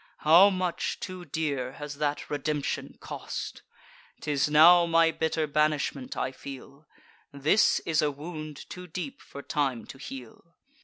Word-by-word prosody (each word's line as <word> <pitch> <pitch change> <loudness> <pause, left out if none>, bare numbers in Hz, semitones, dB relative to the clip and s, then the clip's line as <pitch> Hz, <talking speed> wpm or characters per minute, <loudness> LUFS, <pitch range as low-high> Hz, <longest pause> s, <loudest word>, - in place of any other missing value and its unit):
How 170 +6 +8
much 185 -3 -2
too 185 -2 -7
dear 140 -5 -2
has 145 -1 -8
that 150 -1 -1
redemption 145 0 -3
cost! - - -6 0.6
'Tis 145 -1 0
now 170 +3 +7
my 165 0 +4
bitter 160 0 -1
banishment 150 -3 0
I 130 - -1
feel: 140 +2 -11 0.4
This 145 +9 +3
is 160 -2 +1
a 150 - +2
wound 155 0 -8
too 180 0 -9
deep 185 - -6
for 140 - -10
time 135 -6 -1
to 135 - -11
heal. 135 +5 -10
150 Hz, 140 wpm, -28 LUFS, 140-165 Hz, 0.6 s, How